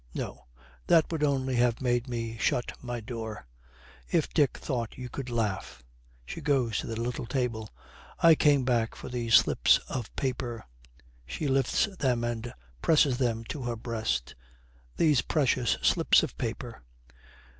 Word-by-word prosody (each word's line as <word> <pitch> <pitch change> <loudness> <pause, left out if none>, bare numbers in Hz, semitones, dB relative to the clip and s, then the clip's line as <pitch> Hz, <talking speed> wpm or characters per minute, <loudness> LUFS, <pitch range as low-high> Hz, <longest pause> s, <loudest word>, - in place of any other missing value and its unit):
'No, - - -6 0.4
that 165 -1 +4
would 160 -2 -2
only 135 -3 +1
have 120 -1 +2
made 120 -1 0
me 115 -2 -3
shut 120 - 0
my 120 -1 -4
door. 110 - -6 0.6
If - - 0
Dick 145 -3 +2
thought 120 -5 -4
you 125 -1 -6
could 130 -1 -6
laugh!' 105 - -3 0.4
She - - -7
goes 125 -7 +1
to - - -5
the 115 -1 -4
little 120 0 -3
table. 115 -5 -2 0.5
'I 165 -1 +7
came 145 -4 +3
back 120 -3 +1
for - - -8
these 120 -2 +2
slips - - +5
of 120 -5 -4
paper.' 125 - -3 0.6
She 150 - -3
lifts 135 -2 +2
them 125 -4 +1
and 120 0 -3 0.3
presses 140 - +3
them 115 -3 0
to 145 - -4
her 120 -1 -2
breast. 110 - -2 0.6
'These 150 -6 +4
precious 130 -5 +1
slips - - +4
of - - -4
paper!' - - -5
120 Hz, 150 wpm, -28 LUFS, 115-135 Hz, 0.6 s, I